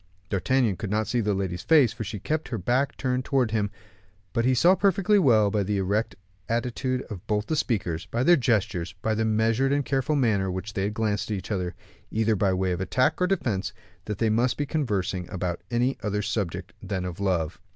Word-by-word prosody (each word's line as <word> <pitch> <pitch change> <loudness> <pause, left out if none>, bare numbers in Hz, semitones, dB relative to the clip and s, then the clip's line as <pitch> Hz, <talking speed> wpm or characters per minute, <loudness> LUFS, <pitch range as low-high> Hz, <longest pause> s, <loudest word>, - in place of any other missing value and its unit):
D'Artagnan 105 +2 +1
could 100 - -4
not 110 +2 +1
see 120 +4 0
the 105 -2 0
lady's 90 -2 -2
face, 145 -8 +4
for 115 - -5
she 105 +1 -5
kept 155 +10 -2
her 120 - -3
back 125 +8 0
turned 130 -1 -1
towards 125 -4 +1
him; 105 -2 +1 0.6
but 115 - +1
he 130 0 +3
saw 170 +9 +6
perfectly 200 +1 +3
well, 110 - +4
by 105 - +1
the 100 +1 -1
erect 100 +2 0 0.3
attitude 125 +2 -1
of 100 -7 -9
both 105 0 0
the 160 - -1
speakers, 95 - -1
by 120 +2 -1
their 175 +5 +7
gestures, 105 - 0
by 110 - +1
the 110 +1 0
measured 110 +5 +2
and 140 -1 +1
careful 135 +2 0
manner 110 -8 +2
with 95 0 -3
which 105 +2 -8
they 100 +1 0
glanced 105 -1 -1
at 105 - -1
each 95 - -8
other, 90 -3 -2 0.3
either 110 0 +1
by 100 -1 +2
way 95 0 0
of 90 - -2
attack 130 - +1
or 180 - +4
defense, 105 - -1 0.3
that 105 -2 -4
they 110 0 +1
must 120 +3 +1
be 145 - -1
conversing 100 - -2
about 90 -2 -3
any 125 +3 +1
other 105 0 -1
subject 95 -4 -3
than 95 -2 -3
of 90 -1 -6
love. 90 -5 -1
110 Hz, 215 wpm, -26 LUFS, 95-125 Hz, 0.6 s, their